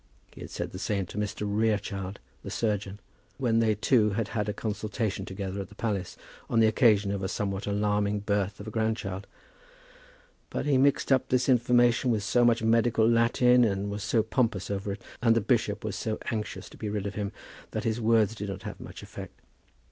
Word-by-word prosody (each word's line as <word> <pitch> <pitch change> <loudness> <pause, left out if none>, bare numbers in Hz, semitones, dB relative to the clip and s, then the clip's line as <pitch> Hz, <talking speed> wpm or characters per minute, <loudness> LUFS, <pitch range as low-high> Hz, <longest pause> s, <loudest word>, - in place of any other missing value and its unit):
He - - -12
had - - -7
said - - -4
the 90 - -7
same 100 -1 -1
to 95 - -10
Mr. 105 0 -3
Rerechild, 100 -2 -1 0.2
the - - -7
surgeon, 105 -3 -2 0.4
when 120 -4 +2
they 110 -2 +3
two 105 +1 +3
had 110 +1 -1
had 105 -2 -2
a - - +1
consultation 105 -2 -3
together 95 -1 -4
at 95 - -8
the 105 - -15
palace 100 -5 -3 0.3
on 115 - +2
the 110 - +6
occasion 110 -3 +4
of 100 -1 -2
a 95 - -1
somewhat 100 0 -3
alarming 105 0 +1
birth 100 -1 -1
of 105 - -8
a - - -5
grandchild. 110 -4 -2 1.2
But - - -3
he 140 -3 +3
mixed 140 +1 +2
up 130 -1 +3
this 125 -1 +2
information 120 0 +4
with 110 -3 +1
so 120 +3 +3
much 115 -1 +3
medical 115 0 +3
Latin, 120 +2 +4
and 100 -2 0
was 100 0 -4
so 110 +1 +2
pompous 110 -5 0
over 100 0 -2
it, 100 - -10 0.2
and 115 -2 +4
the - - +4
bishop 105 -2 0
was 105 -2 -3
so 110 +2 -2
anxious 110 -2 -4
to - - -14
be 105 - -4
rid 105 -1 -2
of 100 - -3
him, 100 -1 -3 0.4
that - - -3
his 115 +1 -1
words 110 -1 +3
did 105 -2 -5
not 95 - -6
have - - -7
much - - -10
effect. - - -10
105 Hz, 205 wpm, -28 LUFS, 100-115 Hz, 1.2 s, the